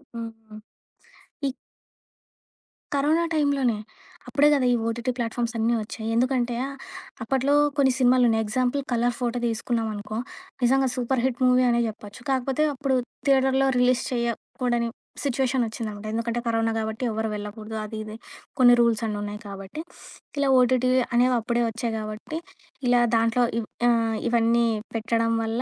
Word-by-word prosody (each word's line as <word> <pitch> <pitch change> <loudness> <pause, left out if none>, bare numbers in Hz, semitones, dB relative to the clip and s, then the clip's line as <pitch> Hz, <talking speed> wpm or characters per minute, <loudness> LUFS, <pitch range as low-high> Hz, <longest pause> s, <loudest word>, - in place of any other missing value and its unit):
హుహు. 225 -2 -8 0.9
ఈ 270 - -1 1.4
కరోనా 305 +4 +2
టైంలోనే. 280 -7 +2 0.5
అప్పుడే 280 +4 +4
గదా! 275 -3 +2
ఈ - - +3
ఓటిటి 235 +2 -1
ప్లాట్‌ఫామ్స్ 235 0 -2
అన్నీ 225 +1 +2
ఒచ్చాయి. 220 +1 -7
ఎందుకంటే, 245 0 +1 0.7
అప్పట్లో 270 +4 +1 0.2
కొన్ని 270 -2 +4
సినిమాలున్నయి. 245 -3 +4
ఎగ్జాంపుల్ 255 +5 0
'కలర్ 240 0 +1
ఫోటో' 245 -1 -1
తీసుకున్నామనుకో, 220 -2 -2 0.5
నిజంగా 265 +2 +4
సూపర్ 250 0 0
హిట్ 260 -2 -1
మూవీ 250 0 +5
అనే 235 0 +2
జెప్పొచ్చు. 210 +1 -9
కాకపోతే 265 +2 +1
అప్పుడు 270 -1 0 0.3
థియేటర్‌లో 265 0 +4
రిలీజ్ 250 +1 +3
చేయకూడని 235 0 -1 0.3
సిచ్యుయేషన్ 265 -2 +1
ఒచ్చిందనమాట. 215 -2 -6
ఎందుకంటే, 230 +1 -1
కరోనా 225 0 +1
కాబట్టి, 220 +2 -3
ఎవ్వరు 220 0 -2
వెళ్ళకూడదు. 215 +1 -6
అది, 215 +1 -7
ఇది 215 0 -8 0.4
కొన్ని 245 -1 +8
రూల్స్ 235 -1 +2
అన్నీ 210 -1 -3
ఉన్నాయి 205 0 -5
కాబట్టి, 195 +8 -7 0.6
ఇలా 280 -1 +2
ఓటిటి 255 0 +3 0.2
అనేవప్పుడే 240 -1 +2
ఒచ్చాయి 230 0 -3
కాబట్టి 215 +9 -5 0.5
ఇలా 245 0 +4
దాంట్లో 230 +2 +3 0.2
ఇవ్ 220 - -5 0.2
ఆహ్, 225 -2 +2
ఇవన్నీ 235 0 +3 0.3
పెట్టడం 230 0 +1
వల్ల 225 +2 -1
235 Hz, 130 wpm, -25 LUFS, 225-255 Hz, 1.4 s, కొన్ని